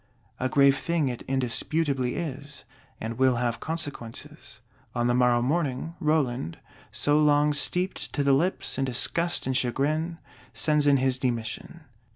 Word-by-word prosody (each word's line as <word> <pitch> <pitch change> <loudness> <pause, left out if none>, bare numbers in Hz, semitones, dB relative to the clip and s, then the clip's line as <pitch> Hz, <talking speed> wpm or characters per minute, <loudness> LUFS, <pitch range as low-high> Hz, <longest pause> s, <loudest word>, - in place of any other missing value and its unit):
A 130 - 0
grave 140 0 +4
thing 165 -5 0
it 120 - -5
indisputably 130 +1 0
is; 145 -3 -6 0.4
and 115 +2 -5
will 130 -1 +4
have 120 -1 -1
consequences. 145 -8 -6 0.4
On 120 -1 +1
the 120 - +2
morrow 120 -1 +3
morning, 145 +1 -1
Roland, 135 - 0 0.3
so 145 +1 +2
long 150 0 +4
steeped 180 +6 0
to 145 - 0
the 140 0 +4
lips 160 -1 0
in 135 - +1
disgust 170 +7 0
and 130 0 -1
chagrin, 155 +7 0 0.4
sends 150 -1 +2
in 140 -1 +5
his 130 -1 0
demission. 120 +6 -3
140 Hz, 145 wpm, -26 LUFS, 125-155 Hz, 0.4 s, in